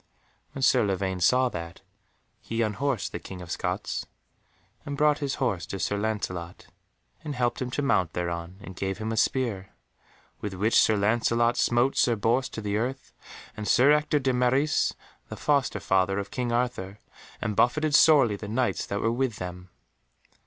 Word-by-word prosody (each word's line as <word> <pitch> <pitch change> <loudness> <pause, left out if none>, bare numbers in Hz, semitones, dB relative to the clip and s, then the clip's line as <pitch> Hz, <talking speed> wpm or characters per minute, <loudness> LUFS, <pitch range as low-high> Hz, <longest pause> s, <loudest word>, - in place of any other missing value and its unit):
When 135 - -4
Sir 125 -2 +4
Lavaine 95 -2 -1
saw 125 +9 +4
that, 85 -5 -7 0.6
he 115 0 -2
unhorsed 115 +2 -1
the - - -5
King 95 - -9
of 90 -2 -9
Scots, - - -3 0.8
and 140 0 -5
brought 150 0 +3
his 140 -3 -2
horse 100 -10 -1
to 95 - -5
Sir 100 - -1
Lancelot, 95 -5 -4 0.6
and 150 -2 -5
helped 120 0 -1
him 125 - -2
to 145 +3 -2
mount 95 - +1
thereon 85 +1 -4
and 95 -1 -10
gave 95 +1 -3
him 110 +1 -4
a - - -1
spear, 110 -5 0 0.7
with 105 -2 -5
which 105 +5 0
Sir 110 - +3
Lancelot 115 +3 +2
smote 120 +3 +2
Sir 120 - +3
Bors 120 +5 +1
to 110 - -6
the 105 0 -1
earth 130 +4 -4 0.4
and 105 -1 -5
Sir 135 +4 +5
Ector 150 0 +2
de 130 -2 0
Maris, 130 +4 +2 0.3
the - - -7
foster 140 -7 +1
father 95 0 +1
of 100 0 -4
King 125 -2 -2
Arthur, 120 -5 -2 0.4
and 105 -1 -2
buffeted 150 +7 +2
sorely 140 -8 +6
the 105 +1 -8
Knights 120 +4 -1
that 100 - -3
were 115 - +1
with 125 -1 -1
them. 90 0 -7
115 Hz, 175 wpm, -26 LUFS, 95-130 Hz, 0.8 s, sorely